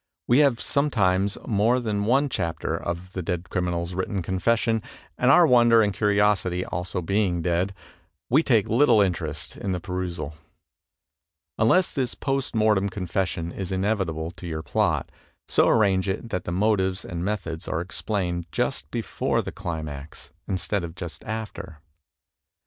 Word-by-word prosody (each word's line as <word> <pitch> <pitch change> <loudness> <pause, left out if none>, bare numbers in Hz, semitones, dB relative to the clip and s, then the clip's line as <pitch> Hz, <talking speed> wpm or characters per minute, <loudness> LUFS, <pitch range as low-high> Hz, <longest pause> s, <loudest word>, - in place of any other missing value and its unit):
We 120 +4 +5
have 140 -6 +4
sometimes 100 -9 +1
more 110 +4 +2
than 105 -4 -1
one 135 +6 +3
chapter 85 - -2
of 90 +2 -5
the 90 - -3
dead 90 +1 -4
crimmal's 90 -1 -1
written 95 +1 -2
confession, 115 +5 +1 0.3
and 125 - +2
our 175 +5 +7
wonder 120 -4 +6
and 100 -1 0
curiosity 100 -3 +2
also 90 0 -3
being 95 -2 +1
dead, 90 +3 0 0.5
we 140 +6 +4
take 115 -10 +2
little 120 -1 +4
interest 80 -6 -1
in 95 - -3
the 90 - -2
perusal. 90 -5 -4 1.3
Unless 175 +12 +4
this 130 -3 -2
post 135 -3 -2
mortem 105 -2 +3
confession 90 -2 -2
is 95 0 -5
inevitable 95 -5 -1
to 90 - -9
your 80 -1 -4
plot, - - 0 0.4
so - - +4
arrange 100 -3 +3
it 105 +4 -3
that 90 - -2
the - - -3
motives 95 -1 +1
and 85 -2 -4
methods 90 -5 -3
are 80 - -1
explained 90 -1 -2
just - - -1
before - - -1
the - - -5
climax 80 -3 -6 0.2
instead 95 0 -1
of 85 0 -6
just 85 -1 -7
after. 105 -6 -6
95 Hz, 150 wpm, -25 LUFS, 85-110 Hz, 1.3 s, our